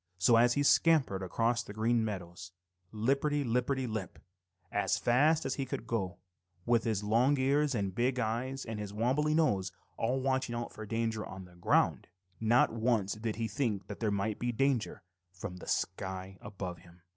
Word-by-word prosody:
So, 95 Hz, +6 st, +5 dB
as 120 Hz, +1 st, +5 dB
he 145 Hz, -, +2 dB
scampered 145 Hz, -, +4 dB
across 115 Hz, +5 st, 0 dB
the 100 Hz, -, -9 dB
Green 115 Hz, +2 st, +1 dB
Meadows, 90 Hz, -4 st, -6 dB, 0.4 s
lipperty 140 Hz, +6 st, +1 dB
lipperty 125 Hz, +3 st, 0 dB
lip, 110 Hz, -6 st, -4 dB, 0.5 s
as 105 Hz, -, +1 dB
fast 150 Hz, +7 st, +3 dB
as 135 Hz, -, 0 dB
he 135 Hz, -, -2 dB
could 115 Hz, -, -4 dB
go, 105 Hz, -6 st, -2 dB, 0.5 s
with 120 Hz, -1 st, +2 dB
his 110 Hz, -3 st, 0 dB
long 120 Hz, +7 st, +3 dB
ears 140 Hz, +1 st, +2 dB
and 100 Hz, -3 st, 0 dB
his -, -, -10 dB
big 125 Hz, +5 st, +1 dB
eyes 125 Hz, +4 st, -2 dB
and 110 Hz, -2 st, -5 dB
his 105 Hz, -1 st, -5 dB
wobbly 130 Hz, +8 st, +1 dB
nose 100 Hz, -, +2 dB, 0.3 s
all 125 Hz, +3 st, 0 dB
watching 130 Hz, -2 st, 0 dB
out 120 Hz, 0 st, -4 dB
for 110 Hz, -1 st, -8 dB
danger 115 Hz, -1 st, -1 dB
on 95 Hz, -1 st, -8 dB
the 90 Hz, -, -17 dB
ground, 85 Hz, -, +2 dB, 0.3 s
not 115 Hz, +1 st, +3 dB
once 115 Hz, -4 st, +1 dB
did 110 Hz, 0 st, -3 dB
he 115 Hz, 0 st, -2 dB
think 105 Hz, -3 st, -1 dB
that 100 Hz, -, -8 dB
there 110 Hz, -, 0 dB
might 100 Hz, +1 st, -1 dB
be 120 Hz, 0 st, 0 dB
danger 125 Hz, -4 st, 0 dB, 0.3 s
from 90 Hz, 0 st, -7 dB
the -, -, -11 dB
sky 95 Hz, +1 st, -3 dB
above 95 Hz, -4 st, -6 dB
him. 85 Hz, -1 st, -19 dB
115 Hz, 180 wpm, -32 LUFS, 100-130 Hz, 0.5 s, So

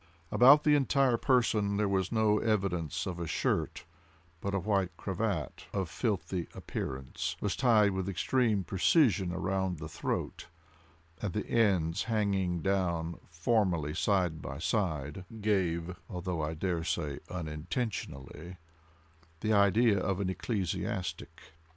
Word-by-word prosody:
About 140 Hz, +5 st, +7 dB
the 150 Hz, -, +4 dB
entire 135 Hz, -3 st, +3 dB
person 110 Hz, -5 st, +2 dB
there 105 Hz, 0 st, +2 dB
was 95 Hz, -2 st, 0 dB
no 110 Hz, -2 st, +3 dB
evidence 95 Hz, -6 st, -1 dB
of 90 Hz, -3 st, -4 dB
a 85 Hz, -, -3 dB
shirt, -, -, -1 dB, 0.5 s
but 100 Hz, +3 st, -2 dB
a -, -, +1 dB
white 95 Hz, -1 st, +1 dB
cravat, 95 Hz, -, -3 dB
of 95 Hz, -5 st, -2 dB
filthy 95 Hz, -, -2 dB
appearance, 65 Hz, 0 st, -4 dB
was 105 Hz, -, -1 dB
tied 110 Hz, -5 st, +4 dB
with 95 Hz, 0 st, -2 dB
extreme 110 Hz, 0 st, +1 dB
precision 95 Hz, -, +3 dB
around 95 Hz, 0 st, -1 dB
the 80 Hz, +1 st, -6 dB
throat 75 Hz, -, -3 dB, 0.7 s
and 105 Hz, -4 st, -2 dB
the 105 Hz, -, -2 dB
ends 95 Hz, -6 st, +2 dB
hanging 100 Hz, -6 st, 0 dB
down 85 Hz, -4 st, 0 dB
formally 85 Hz, -3 st, +1 dB
side 90 Hz, -3 st, +1 dB
by 65 Hz, 0 st, -6 dB
side 80 Hz, -3 st, -1 dB, 0.2 s
gave 90 Hz, -5 st, 0 dB
(although 90 Hz, -4 st, -3 dB
I 75 Hz, +1 st, -2 dB
dare 85 Hz, 0 st, -1 dB
say 75 Hz, -3 st, -2 dB
unintentionally) 85 Hz, -, -5 dB, 0.8 s
the 110 Hz, -, +1 dB
idea 100 Hz, +1 st, +4 dB
of 95 Hz, +1 st, -1 dB
an 95 Hz, -2 st, 0 dB
ecclesiastic. 95 Hz, -1 st, -3 dB
95 Hz, 125 wpm, -31 LUFS, 85-105 Hz, 0.8 s, About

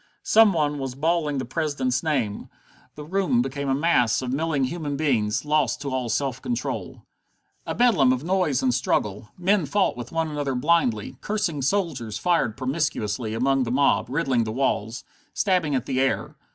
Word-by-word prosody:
Some 220 Hz, -1 st, +6 dB
one 150 Hz, -3 st, 0 dB
was 135 Hz, -2 st, -4 dB
bawling 155 Hz, 0 st, 0 dB
the 130 Hz, -, -2 dB
President's 130 Hz, -3 st, -1 dB
name. 130 Hz, -10 st, -2 dB, 0.5 s
The 150 Hz, -, -8 dB
rooms 170 Hz, -7 st, +1 dB
became 135 Hz, +1 st, -4 dB
a 135 Hz, -, +2 dB
mass 135 Hz, -6 st, +2 dB
of 125 Hz, 0 st, -3 dB
milling 150 Hz, -1 st, 0 dB
human 145 Hz, +1 st, -3 dB
beings, 120 Hz, -7 st, 0 dB
lost 150 Hz, 0 st, +1 dB
to 140 Hz, -, -4 dB
all 130 Hz, -2 st, -2 dB
self 130 Hz, +2 st, -1 dB
control. 245 Hz, -1 st, -4 dB, 0.6 s
A -, -, -2 dB
bedlam 200 Hz, -, +4 dB
of 130 Hz, +1 st, -1 dB
noise 175 Hz, -7 st, +1 dB
and 130 Hz, -1 st, +2 dB
struggle. 105 Hz, -4 st, -1 dB
Men 185 Hz, -2 st, +2 dB
fought 205 Hz, -2 st, +1 dB
with 120 Hz, -1 st, -8 dB
one 165 Hz, 0 st, 0 dB
another 145 Hz, -3 st, -2 dB
blindly, 130 Hz, -5 st, +1 dB
cursing 205 Hz, -9 st, -2 dB
soldiers 135 Hz, -, -1 dB
fired 150 Hz, -6 st, +1 dB
promiscuously 130 Hz, -6 st, -2 dB
among 135 Hz, +3 st, +2 dB
the 125 Hz, -, -1 dB
mob, 130 Hz, -2 st, +2 dB
riddling 135 Hz, -4 st, +1 dB
the 110 Hz, -, -4 dB
walls, 115 Hz, -2 st, -1 dB, 0.3 s
stabbing 180 Hz, -8 st, +1 dB
at 130 Hz, -1 st, -1 dB
the 130 Hz, -2 st, -1 dB
air. 135 Hz, -, -1 dB
140 Hz, 170 wpm, -24 LUFS, 125-165 Hz, 0.6 s, Some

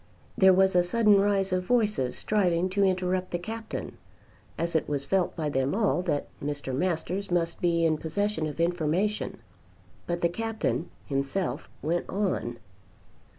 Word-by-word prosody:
There 190 Hz, -1 st, +6 dB
was 190 Hz, 0 st, +4 dB
a 180 Hz, -, +6 dB
sudden 205 Hz, +2 st, +4 dB
rise 195 Hz, -2 st, +1 dB
of 180 Hz, 0 st, +1 dB
voices 210 Hz, -, +1 dB
striving 185 Hz, -4 st, +1 dB
to 200 Hz, +2 st, +1 dB
interrupt 185 Hz, -1 st, +1 dB
the 175 Hz, -, -1 dB
Captain, 220 Hz, +5 st, -6 dB, 0.6 s
as 170 Hz, 0 st, -1 dB
it 160 Hz, -, +1 dB
was 140 Hz, -2 st, -2 dB
felt 190 Hz, +1 st, +1 dB
by 160 Hz, -3 st, -2 dB
them 135 Hz, +3 st, 0 dB
all 205 Hz, -4 st, +2 dB
that 155 Hz, -6 st, -1 dB, 0.2 s
Mr. 145 Hz, -2 st, -3 dB
Masters 180 Hz, +5 st, -1 dB
must 170 Hz, -1 st, 0 dB
be 170 Hz, -1 st, +2 dB
in 155 Hz, -2 st, +2 dB
possession 165 Hz, 0 st, -1 dB
of 150 Hz, +1 st, -7 dB
information; 175 Hz, +4 st, 0 dB, 0.7 s
but 175 Hz, 0 st, -2 dB
the 170 Hz, -, +3 dB
Captain 195 Hz, -, -2 dB, 0.2 s
himself 140 Hz, +7 st, -2 dB
went 170 Hz, +3 st, -1 dB
on. 185 Hz, -, -1 dB
180 Hz, 150 wpm, -27 LUFS, 160-195 Hz, 0.7 s, There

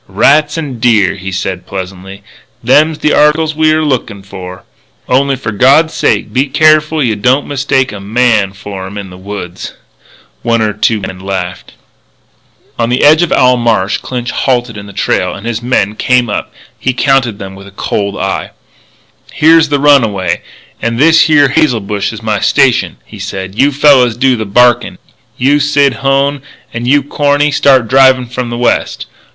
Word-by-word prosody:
"Rats 145 Hz, -, +2 dB
an' 140 Hz, -7 st, -5 dB
deer," 110 Hz, -5 st, +2 dB
he 95 Hz, 0 st, -7 dB
said 95 Hz, 0 st, -4 dB
pleasantly. 95 Hz, +1 st, -8 dB, 0.4 s
"Them's 150 Hz, +6 st, +3 dB
the 150 Hz, -, 0 dB
articles 155 Hz, +1 st, +2 dB
we're 155 Hz, 0 st, +1 dB
lookin' 115 Hz, -8 st, -3 dB
for. 95 Hz, -1 st, -10 dB, 0.4 s
Only 135 Hz, +2 st, +1 dB
for 120 Hz, -4 st, -5 dB
God's 140 Hz, +10 st, +3 dB
sake -, -, -1 dB
be 135 Hz, +3 st, +1 dB
careful 155 Hz, +2 st, +2 dB
you 115 Hz, -4 st, 0 dB
don't 125 Hz, +7 st, +1 dB
mistake 135 Hz, -2 st, -1 dB
a 105 Hz, -, -8 dB
man 105 Hz, -1 st, 0 dB
for 95 Hz, -1 st, -8 dB
'em 100 Hz, +2 st, -9 dB
in 100 Hz, -2 st, -8 dB
the 90 Hz, -, -12 dB
woods." 95 Hz, -2 st, -8 dB, 0.7 s
One 115 Hz, 0 st, 0 dB
or 110 Hz, -1 st, 0 dB
two 105 Hz, +1 st, 0 dB
men 95 Hz, -1 st, -7 dB
laughed. 95 Hz, -2 st, -6 dB, 1.1 s
On 115 Hz, 0 st, 0 dB
the 125 Hz, +1 st, 0 dB
edge 155 Hz, +3 st, +5 dB
of 175 Hz, -, 0 dB
Owl 125 Hz, 0 st, +3 dB
Marsh 115 Hz, -4 st, 0 dB
Clinch 125 Hz, -1 st, -5 dB
halted 120 Hz, -3 st, -1 dB
in 100 Hz, -1 st, -9 dB
the -, -, -10 dB
trail, 95 Hz, -1 st, -1 dB
and, 100 Hz, -, -10 dB
as 120 Hz, -2 st, -2 dB
his -, -, -9 dB
men 115 Hz, -5 st, 0 dB
came 125 Hz, 0 st, 0 dB
up, -, -, -4 dB, 0.3 s
he 130 Hz, -, -1 dB
counted 130 Hz, -5 st, +1 dB
them 95 Hz, -1 st, -8 dB
with 100 Hz, +1 st, -13 dB
a 100 Hz, -, -17 dB
cold 100 Hz, -1 st, -3 dB
eye. 95 Hz, -, -3 dB, 0.8 s
"Here's 160 Hz, 0 st, +3 dB
the 145 Hz, -, +1 dB
runway 110 Hz, -12 st, +2 dB, 0.4 s
and 115 Hz, 0 st, -2 dB
this 160 Hz, +5 st, +4 dB
here 145 Hz, -3 st, +4 dB
hazel 150 Hz, -6 st, +1 dB
bush 100 Hz, 0 st, -3 dB
is 115 Hz, 0 st, -10 dB
my 110 Hz, -2 st, -1 dB
station," -, -, +1 dB
he -, -, -13 dB
said. 95 Hz, 0 st, -6 dB
"You 140 Hz, +7 st, +2 dB
fellas 135 Hz, -5 st, +3 dB
do 130 Hz, 0 st, +2 dB
the 110 Hz, -2 st, -4 dB
barkin'. 120 Hz, +4 st, +2 dB, 0.4 s
You, 140 Hz, +3 st, +2 dB
Sid 145 Hz, -2 st, +2 dB
Hone, 135 Hz, +1 st, 0 dB, 0.3 s
and 115 Hz, +1 st, -4 dB
you, 140 Hz, +2 st, +3 dB
Corny, 145 Hz, +1 st, 0 dB
start 135 Hz, -4 st, +3 dB
drivin' 130 Hz, 0 st, +4 dB
from 125 Hz, 0 st, -5 dB
the 120 Hz, -, -5 dB
west. 120 Hz, 0 st, -1 dB
120 Hz, 175 wpm, -11 LUFS, 100-140 Hz, 1.1 s, edge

